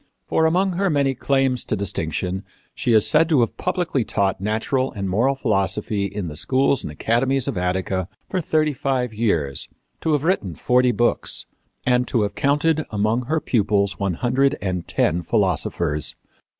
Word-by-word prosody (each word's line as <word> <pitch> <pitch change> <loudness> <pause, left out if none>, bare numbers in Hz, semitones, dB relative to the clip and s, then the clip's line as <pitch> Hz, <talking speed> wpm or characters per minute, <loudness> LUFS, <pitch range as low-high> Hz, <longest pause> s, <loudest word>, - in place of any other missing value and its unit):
For 160 - +2
among 185 +4 +2
her 195 0 +1
many 140 -3 +2
claims 135 -1 +1
to - - -1
distinction 90 -1 -2 0.3
she 120 - -1
is 110 -2 +5
said 160 +2 +4
to 150 -6 +4
have 115 - 0
publicly 175 -8 -1
taught 95 -3 -1
natural 110 +6 0
and 100 -2 -4
moral 120 +9 +2
philosophy 105 -3 0
in 100 -2 -4
the 75 - -7
schools 135 - +2
and - - -6
academies 120 - 0
of - - -2
Attica 95 0 -1 0.2
for 185 - -1
thirty 155 -1 +1
five 130 -3 -1
years, 85 - -1 0.3
to 160 - +1
have 145 -1 +1
written 135 - 0
forty 125 +5 +3
books, 120 0 +1 0.4
and 125 0 +2
to 115 -4 +1
have 100 - -2
counted 150 +3 +1
among 110 +4 0
her 155 +5 0
pupils 100 - +1
one 95 -3 -1
hundred 130 +6 +1
and 90 -2 -3
ten 85 +3 +1
philosophers. 85 - 0
115 Hz, 165 wpm, -22 LUFS, 95-135 Hz, 0.4 s, is